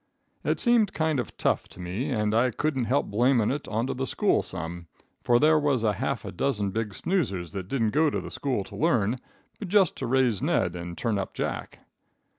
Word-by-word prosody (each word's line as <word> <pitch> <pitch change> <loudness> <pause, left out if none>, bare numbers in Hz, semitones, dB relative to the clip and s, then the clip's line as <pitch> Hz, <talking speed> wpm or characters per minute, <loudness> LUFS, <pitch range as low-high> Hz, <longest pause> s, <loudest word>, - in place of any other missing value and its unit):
"It - - 0
seemed 235 -5 +3
kind 160 -3 +1
of 120 - -5
tough - - 0
to - - -15
me, 95 +11 -3
and 105 -4 0
I 120 +3 +3
couldn't 135 +1 -1
help 135 +5 +1
blamin' 120 +1 +3
it 145 +1 -4
onto 115 +4 -1
the 130 +1 -3
school 210 - +2
some, 85 -1 -6 0.3
for 120 -1 +4
there 155 +4 +5
was 140 -6 +1
a 105 -2 +3
half 100 - -2
a - - -5
dozen 105 -1 -1
big 105 -1 -3
snoozers 105 - -1
that 95 -1 -5
didn't 115 -3 0
go 155 +4 +3
to - - -4
school 130 -8 -1
to - - -11
learn, 120 -7 +2 0.4
but 205 - -5
just 195 -2 +3
to - - -3
raise 125 -5 +2
Ned 90 - +1
and 85 -1 -6
turn 110 0 0
up 95 - -5
Jack. - - -4
120 Hz, 205 wpm, -27 LUFS, 100-145 Hz, 0.4 s, there